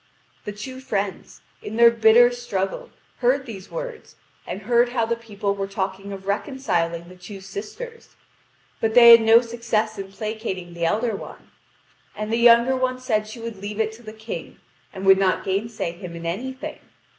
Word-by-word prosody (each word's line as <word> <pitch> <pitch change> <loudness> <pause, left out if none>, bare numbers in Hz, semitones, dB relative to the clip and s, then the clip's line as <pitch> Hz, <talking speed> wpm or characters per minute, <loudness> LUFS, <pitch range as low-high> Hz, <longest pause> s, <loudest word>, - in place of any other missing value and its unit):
The 210 - -3
two 255 +6 -8
friends, 200 -7 -4 0.2
in 220 - -7
their 235 0 +7
bitter 235 +1 +6
struggle, 240 - -3 0.3
heard 260 +2 +2
these 200 -6 -9
words, - - -7 0.3
and 190 +3 -6
heard 240 +2 +3
how 240 -2 0
the 235 +1 -1
people 210 -3 -3
were 195 -1 -3
talking 195 0 -4
of 195 -1 -8
reconciling 180 - -1
the 185 - -13
two 180 +2 -10
sisters; 220 - -9 0.6
but 220 0 0
they 235 -1 +10
had 230 0 +10
no 225 +1 +6
success 225 -3 -2
in 195 0 -7
placating 195 -4 -5
the 170 0 -2
elder 220 +5 0
one. - - -11 0.6
And 215 +1 -4
the - - +2
younger 235 +2 +6
one 255 0 0
said 215 -4 -1
she 220 +2 -9
would 230 -2 -6
leave 205 +2 -6
it 220 0 +1
to 220 +2 -14
the 215 -2 -9
King, 220 +1 -8 0.3
and 190 -1 -7
would 195 0 +7
not 190 -1 +1
gainsay 200 -1 -2
him 170 0 -9
in 170 0 -8
anything. 255 +10 -5
220 Hz, 180 wpm, -23 LUFS, 195-235 Hz, 0.6 s, they